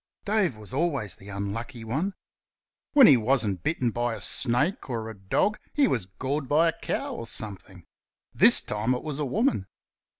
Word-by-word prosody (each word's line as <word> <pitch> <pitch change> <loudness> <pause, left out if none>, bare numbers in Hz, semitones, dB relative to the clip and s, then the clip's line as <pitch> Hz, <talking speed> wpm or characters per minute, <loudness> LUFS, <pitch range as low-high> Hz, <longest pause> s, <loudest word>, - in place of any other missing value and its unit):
Dave 200 - +1
was 105 +3 -9
always 140 - -1
the 100 - -13
unlucky 100 +4 -5
one. 155 - -2 0.8
When 280 -4 +8
he 140 - +8
wasn't 110 -6 +1
bitten 125 - 0
by 120 0 -1
a - - -8
snake 135 - -1
or 115 -2 -3
a - - -11
dog 100 - 0
he 285 -2 +3
was 110 - -1
gored 130 +9 -4
by 160 +3 +4
a 160 - -6
cow - - -3
or 115 - -6
something. 95 -5 -6 0.5
This - - +7
time 110 +4 -1
it 125 - -6
was 150 -2 -5
a 150 - 0
woman. 135 - 0
120 Hz, 175 wpm, -26 LUFS, 105-150 Hz, 0.8 s, When